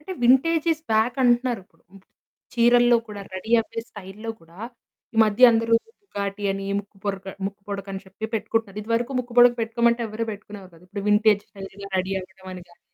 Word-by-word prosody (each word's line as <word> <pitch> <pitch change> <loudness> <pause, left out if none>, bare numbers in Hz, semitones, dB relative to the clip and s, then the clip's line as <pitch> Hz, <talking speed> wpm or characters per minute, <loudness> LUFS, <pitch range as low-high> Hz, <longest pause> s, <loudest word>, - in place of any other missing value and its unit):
అంటే 355 +5 -7
vintages 315 +5 +3
back 220 +3 +2
అంటున్నారు 245 -2 +2
ఇప్పుడు. 165 -3 -33 0.7
చీరల్లో 240 0 +5
కూడా 205 -1 -7
రెడీ 205 +5 -5
అవ్వే 225 0 -5
స్టైల్‌లో 205 +3 -8
కూడా 165 +3 -19 0.6
ఈ - - -8
మధ్య 215 +4 +6
అందరూ 230 0 0 0.3
బుగాటి 200 - -5
అని, 195 0 -5
ముక్కు 200 0 -22
పొరక 195 -1 -3 0.2
ముక్కు 200 0 -8
పుడకని 195 -1 -5
చెప్పి 190 +3 -9
పెట్టుకుంటున్నారు. 220 -2 -2
ఇదివరకు 230 +4 -1
ముక్కు 245 -1 -5
పుడక 245 0 +8
పెట్టుకోమంటే 235 +1 +1
ఎవ్వరు 220 +1 -3
పెట్టుకునేరు 205 -2 -10
కాదు. 165 +2 -19
ఇప్పుడు 200 +2 -5
వింటేజ్డ్ 210 -1 +4
స్టైల్‌‌గా 195 0 -10
రెడీ 190 +1 -2
అవ్వడం 190 0 -13
అనిగాని. 175 -1 -13
215 Hz, 160 wpm, -24 LUFS, 195-235 Hz, 0.7 s, పుడక